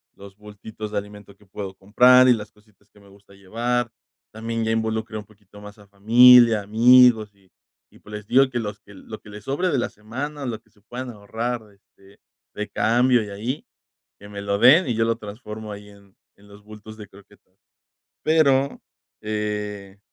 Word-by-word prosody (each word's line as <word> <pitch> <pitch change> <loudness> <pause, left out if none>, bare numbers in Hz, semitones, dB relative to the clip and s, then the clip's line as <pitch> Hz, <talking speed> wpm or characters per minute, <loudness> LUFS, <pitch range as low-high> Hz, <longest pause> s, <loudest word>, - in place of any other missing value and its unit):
los 100 0 -15
bultitos 105 +1 -10
de 105 - -1
alimento 105 -1 -13
que 105 - -24
puedo 95 0 -7
comprar, 125 +6 +5
y - - +7
las 105 -2 -6
cositas 105 -1 -30
que 105 - -22
me 100 -1 -20
gusta 100 0 -21
llevar. 115 +5 -3 0.4
También, 115 +1 -4
ya 110 - -1
involucré 110 0 -3
un 105 - -8
poquito 105 -1 -19
más 105 0 -12
a 100 - -18
familia, 115 +3 +6
amigos, 115 0 +4
y 95 -1 -29 0.4
y - - -20
pues, 105 - -15
les 105 -1 -9
digo, 135 +3 +4
que 125 - -5
los 105 -2 -6
que 100 - -18
lo 110 +3 -11
que - - -15
les 105 0 -11
sobre 145 +7 -1
de 145 - 0
la 120 - -2
semana, 135 +7 -7
lo 115 -3 -5
que - - -33
se 105 - -29
puedan 125 +4 -8
ahorrar, 115 +3 -5
este 100 0 -25 0.4
de 105 0 -5
cambio 120 +2 +2
y 105 - -9
ahí, 115 +8 -5 0.5
que 100 - -13
me 100 -1 -8
lo 100 0 -2
den, 145 - +6
y 120 - -1
yo 115 - +1
lo 115 0 -1
transformo 105 0 -9
ahí 105 0 -12
en 100 -1 -20 0.2
en 100 +1 -21
los 100 0 -17
bultos 105 +1 -13
de 105 -1 -11
croquetas. 100 -1 -21 0.7
Pero, 140 -4 +2 0.4
eh, 105 -2 -5
105 Hz, 195 wpm, -22 LUFS, 100-120 Hz, 0.7 s, y